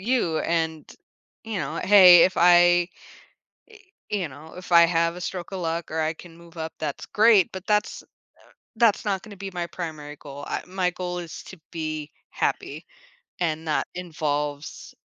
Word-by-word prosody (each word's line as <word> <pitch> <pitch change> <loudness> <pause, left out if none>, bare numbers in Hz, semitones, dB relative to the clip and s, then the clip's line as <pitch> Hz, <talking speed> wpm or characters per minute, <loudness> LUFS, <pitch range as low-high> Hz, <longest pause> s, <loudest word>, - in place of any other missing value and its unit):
you, 195 -7 0
and, 160 -2 -2 0.5
you 220 -3 -4
know, 155 -1 -4
hey, 185 -4 +9
if 185 - 0
I, 175 0 +5 1.2
eh 210 - +1
you 175 - -2
know, 150 +3 -13
if 180 0 -10
I 170 -1 +8
have 170 0 +1
a 180 - -8
stroke 180 +1 -5
of 190 - -4
luck 165 0 -3
or 160 - -2
I 160 0 0
can 165 0 -14
move 170 0 -17
up, 160 0 -4
that's 150 -3 -4
great, 210 -4 +4
but 190 0 -8
that's 210 -1 0
uh, - - -25 0.7
that's 230 -3 +3
not 195 -3 -1
gonna 210 -2 -12
be 195 0 -7
my 175 -1 -3
primary 155 -4 -7
goal. 145 0 -10
I - - -3
my 185 -1 -1
goal 180 0 -5
is 170 -2 -8
to 190 - -12
be 155 -2 -5 0.2
happy, - - -3 0.5
and 160 -2 -2
that 150 - 0
involves 150 -4 -4
170 Hz, 175 wpm, -24 LUFS, 160-185 Hz, 1.2 s, hey